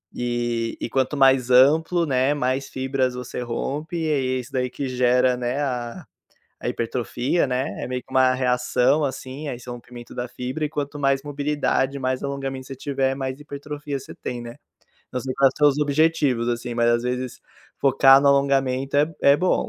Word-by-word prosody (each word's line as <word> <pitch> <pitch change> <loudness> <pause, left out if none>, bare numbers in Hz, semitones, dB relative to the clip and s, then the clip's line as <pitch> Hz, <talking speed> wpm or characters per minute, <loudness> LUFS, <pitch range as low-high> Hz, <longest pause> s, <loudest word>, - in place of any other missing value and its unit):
e 120 -1 -2
e - - -4
quanto 135 +2 0
mais 135 -2 +4
amplo, 160 +7 +5
né, 135 0 +2
mais 130 -1 -1
fibras 130 -1 -1
você 125 0 -6
rompe, 145 +7 -3
e 160 -1 -1
aí 130 -2 0
é - - -2
isso 125 - -9
daí 125 -1 0
que 135 +1 -4
gera, 125 0 +3
né, 125 +3 -2
a 120 -4 -3 0.6
a - - -3
hipertrofia, 125 +6 -1
né, 130 +2 -1 0.2
é - - -2
meio 125 0 -3
que - - -26
uma 130 -1 +4
reação, 125 +3 +2
assim, 135 +2 -5
a 130 - -3
esse 125 +1 -12
rompimento 120 0 -9
da 125 0 -3
fibra 130 +5 -4
e - - -1
quanto 145 -1 -4
mais 135 -1 +1
mobilidade, 145 -1 -1
mais 130 0 -1
alongamento 135 -1 -4
você 135 - -7
tiver, 135 0 -1
mais 135 0 -4
hipertrofia 145 0 -6
você 135 - -11
tem, 120 -1 -5
né. 120 +2 -9 0.6
Não 125 - -1
sei 130 0 -4
quais 135 -2 +4
são 150 - +5
os 145 0 +3
objetivos, 145 -5 +2
assim, 120 0 -3
mas 120 0 +2
às 120 0 +2
vezes 125 0 -3 0.4
focar 135 0 +6
no 140 - +4
alongamento 135 -1 +2
é 150 +3 +2
é 140 +1 +6
bom, 180 +3 +1
130 Hz, 190 wpm, -23 LUFS, 125-140 Hz, 0.6 s, focar